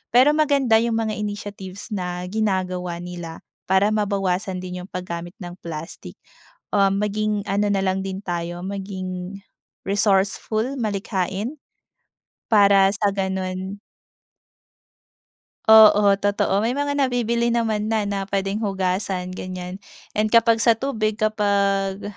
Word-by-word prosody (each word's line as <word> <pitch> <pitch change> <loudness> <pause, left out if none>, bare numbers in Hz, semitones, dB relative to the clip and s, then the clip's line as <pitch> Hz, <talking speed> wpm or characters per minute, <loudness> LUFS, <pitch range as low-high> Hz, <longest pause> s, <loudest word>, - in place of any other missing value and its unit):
Pero 255 +4 +7
maganda 280 -7 +3
yung 230 0 0
mga 225 -1 0
initiatives 205 -1 -6
na 180 -2 -3
ginagawa 185 -4 -1
nila 175 -2 -7 0.3
para 190 +3 +3
mabawasan 195 -2 -1
din 180 0 -6
yung - - -15
paggamit 175 -1 -6
ng 175 0 -8
plastic. 165 0 -8 0.6
Um, 195 -1 +3
maging 210 0 -1
ano 205 +1 +1
na 195 -1 +1
lang 190 0 0
din 190 +1 -5
tayo, 175 0 -4
maging 190 -1 -5 0.4
resourceful, 205 +5 +1
malikhain. 205 - -2 1.0
Para 200 -2 +6
sa 205 0 +1
gano'n 190 0 -3 1.9
Oo, 210 -2 +8
totoo. 200 -1 +1
May 230 +4 0
mga 285 0 -1
nabibili 235 -3 +1
naman 225 -3 0
na, 220 -1 +1
na 200 -1 -3
puwedeng 195 +1 -1
hugasan, 190 -2 -1
ganyan. 185 0 -6 0.3
And 215 +1 +1
kapag 230 0 +4
sa 230 0 +4
tubig 220 -4 -1
kapag 200 -2 +1
200 Hz, 120 wpm, -22 LUFS, 185-215 Hz, 1.9 s, Oo